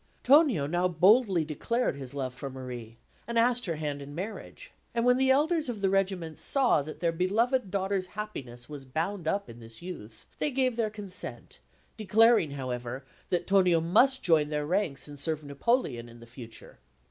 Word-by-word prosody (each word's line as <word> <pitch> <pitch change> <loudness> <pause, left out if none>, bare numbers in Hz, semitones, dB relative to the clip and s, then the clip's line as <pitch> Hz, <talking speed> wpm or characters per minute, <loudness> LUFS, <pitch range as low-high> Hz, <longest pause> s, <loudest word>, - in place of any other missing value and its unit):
Tonio 270 - +5
now 175 +4 +1
boldly 185 0 +4
declared 230 - -1
his 135 -1 -9
love 130 -2 -3
for 135 +2 -6
Marie, 125 -3 -8 0.3
and 235 0 -2
asked 240 0 +2
her 165 - -1
hand 150 -2 -4
in 140 +1 -9
marriage; 200 +6 -7 0.2
and 235 0 +1
when 250 0 +5
the 265 0 +2
elders 300 +2 +2
of 230 -4 -4
the 195 -1 +2
Regiment 190 -5 -1
saw 265 - +2
that 155 +2 -9
their 170 -1 +2
beloved 210 +7 +1
Daughter's 190 -1 -1
happiness 130 - -6
was 145 -2 -8
bound 165 +7 -3
up 200 +4 0
in 115 - -11
this 115 +4 -13
youth, 115 -12 -9
they - - +1
gave 255 -3 +1
their 225 -2 0
consent, 205 -3 -6 0.4
declaring, 220 -4 +4
however, 130 -1 -5 0.2
that 175 -1 0
Tonio 185 -4 +4
must 235 +11 +3
join 155 -4 +3
their 150 -1 -2
ranks 175 -4 -1
and 145 -1 -10
serve 155 +1 -2
Napoleon 140 - -1
in 115 0 -13
future. 115 -1 -12
175 Hz, 175 wpm, -29 LUFS, 140-220 Hz, 0.4 s, Tonio